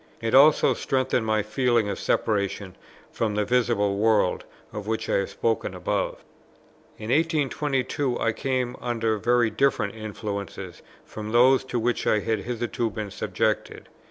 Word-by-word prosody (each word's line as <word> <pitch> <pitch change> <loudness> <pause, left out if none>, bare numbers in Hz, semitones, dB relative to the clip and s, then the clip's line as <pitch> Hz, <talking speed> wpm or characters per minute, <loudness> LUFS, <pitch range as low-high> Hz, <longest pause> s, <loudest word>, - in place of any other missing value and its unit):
It 115 0 -3
also 145 +3 +6
strengthened 130 -3 0
my 110 -1 +1
feeling 120 0 +1
of 100 - -3
separation 100 -3 -1 0.4
from 110 -2 -1
the 105 0 +1
visible 115 -5 +1
world, 105 -3 +2 0.3
of 105 -1 -6
which 110 0 -2
I - - +2
have 100 - -1
spoken 115 -2 -1
above. - - -2 0.7
In 110 +2 -5
1822 145 -3 0
I 115 - +1
came 125 +1 -2
under 115 -3 -1
very 120 +1 +2
different 130 -7 +1
influences 105 -3 -6 0.2
from 105 0 -7
those 130 +2 +5
to 125 - -3
which 120 +1 -1
I - - +4
had 110 +1 -1
hitherto 120 +1 -2
been 105 -1 -6
subjected. - - -2
115 Hz, 145 wpm, -25 LUFS, 105-125 Hz, 0.7 s, also